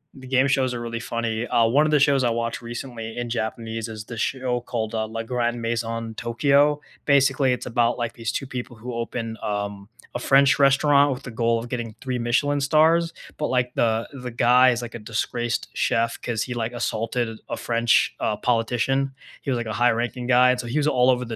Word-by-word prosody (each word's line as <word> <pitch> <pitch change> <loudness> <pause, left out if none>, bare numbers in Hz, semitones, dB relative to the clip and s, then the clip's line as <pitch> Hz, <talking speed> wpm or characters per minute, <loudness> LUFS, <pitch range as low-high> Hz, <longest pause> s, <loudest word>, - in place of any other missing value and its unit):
The 130 -1 -11
game 130 +1 +3
shows 130 -2 +1
are 120 - -4
really 115 0 -4
funny. 115 -1 -3
Uh, 115 - +3
one 145 +7 +3
of - - -1
the 150 - +4
shows 140 -2 +3
I 120 - +3
watched 115 0 -2
recently 120 -1 -7
in 120 -1 -3
Japanese 115 0 -3
is 110 -1 -8
the 120 - -8
show 125 +1 -1
called, 115 -2 -4
uh, 110 -1 -1
Le 115 +1 -5
Grand 120 0 -1
Maison 115 -1 -3
Tokyo. 140 +6 +2 0.3
Basically, 140 -1 +3
it's 125 - -2
about, 120 0 +1
like, 120 -2 -3
these 115 0 -3
2 135 - -3
people 125 -2 -6
who 120 +3 -7
open, 115 -1 -4
um, 100 -1 -4 0.3
a 120 - -1
French 135 +2 +4
restaurant 140 +1 +5
with 135 +1 -5
the 125 - -7
goal 115 0 +1
of 115 +1 -5
getting 115 -3 -4
3 130 -2 -3
Michelin 140 +5 +1
stars, 160 +4 +3 0.3
but, 150 - -1
like, 125 -1 0
the 115 0 +1
the 125 -2 -6
guy 125 +2 +5
is, 120 0 -1
like, 120 - -7
a 120 - -6
disgraced 115 +2 -2
chef 115 0 0
'cause, 115 -2 -2
he, 125 - -5
like 115 0 -3
assaulted 115 -1 -2
a - - -3
French, 115 -1 +2
uh, 105 - 0
politician. 125 +4 0 0.3
He - - -5
was, 130 - +1
like, 120 - -3
a 110 - -4
high-ranking 120 +1 0
guy, 125 0 +5
and 125 - -1
so, 120 - -5
he 120 +6 -2
was 150 - +2
all 125 -3 +3
over 125 -1 +2
the 115 -1 -5
120 Hz, 215 wpm, -24 LUFS, 115-130 Hz, 0.3 s, restaurant